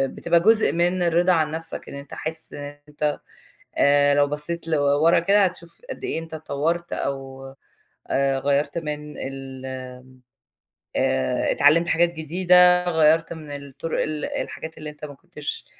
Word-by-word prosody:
بتبقى 170 0 +2
جزء 220 +5 +4
من 175 +2 +1
الرِضا 175 +1 +3
عن 155 -3 +1
نفْسَك 160 +1 -4
إن - - -8
أنت 140 -1 -10
حاسس 160 0 -4
إن 145 0 -8
أنت 150 0 -2 0.6
آآ، 145 0 +4
لو 145 0 +4
بَصّيت 150 +3 -4
لورا 145 +1 +3
كده، 200 +4 +4
هتشوف 170 - -6
قد - - -7
إيه 385 - -2
أنت 165 0 -10
اتطوّرت 160 +3 -2
أو 135 -1 -4 0.7
آآ، 135 0 +1
غيّرت 140 +4 0
من 150 -2 -5
ال 135 -1 -7 1.3
آآ، 65 0 +1
اتعلمت 165 +4 +4
حاجات 170 +1 +2
جديدة 180 +2 +4
غيّرت 160 0 +3
من 155 -3 -10
الطُرُق 140 +3 -4
ال 155 -1 -3
الحاجات 160 0 -5
اللي 155 0 -7
أنت 150 0 -9
ما 145 - -9
كنتش 310 - -6
155 Hz, 150 wpm, -23 LUFS, 145-170 Hz, 1.3 s, جزء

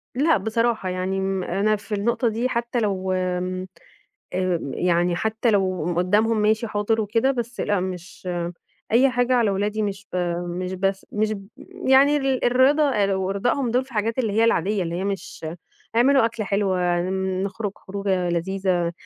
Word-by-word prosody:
لأ 300 +3 +3
بصراحة، 220 0 0
يعني 185 +1 -2
م 190 -1 -1
أنا 200 +5 +1
في 205 +1 -5
النقطة 235 +4 0
دي 230 +4 -1
حتى 235 0 -1
لو 190 -4 -1
آمم، 185 0 -2 0.7
آمم 180 -6 -1
يعني 175 0 +1
حتى 220 +4 0
لو 190 -4 +1
قم 175 +1 -1
قدّامهم 210 +5 +2
ماشي 215 +2 +2
حاضر 215 +1 0
وكده، 225 +5 +1
بس 240 -2 -3
لأ 205 -2 +1
مش 185 0 -6 0.6
أي 260 +4 +5
حاجة 245 +1 +1
على 235 -4 +3
ولادي 205 +2 -1
مش 205 0 -4
ب - - -2 0.3
مش 180 +1 -4
بس 195 +1 -1
مش 215 0 0
ب 195 -2 -7 0.4
يعني 275 +2 +6
ال 270 -2 0
الرضا 275 +4 +4 0.2
أو 190 0 -1
ارضائهم 240 +6 0
دول 250 +3 +1
في 265 - -17
حاجات 225 +3 -1
اللي 225 -5 0
هي 225 +2 +3
العاديّة، 205 -2 +2
اللي 170 -1 -3
هي 180 +2 -2
مش 195 -4 -4 0.5
اعملوا 265 +2 +5
أكلة 225 -2 -2
حلوة، 185 -4 +1 0.4
نخرج 200 +1 -3
خروجة 190 -2 -2
لذيذة، 175 0 0
205 Hz, 165 wpm, -23 LUFS, 185-230 Hz, 0.7 s, يعني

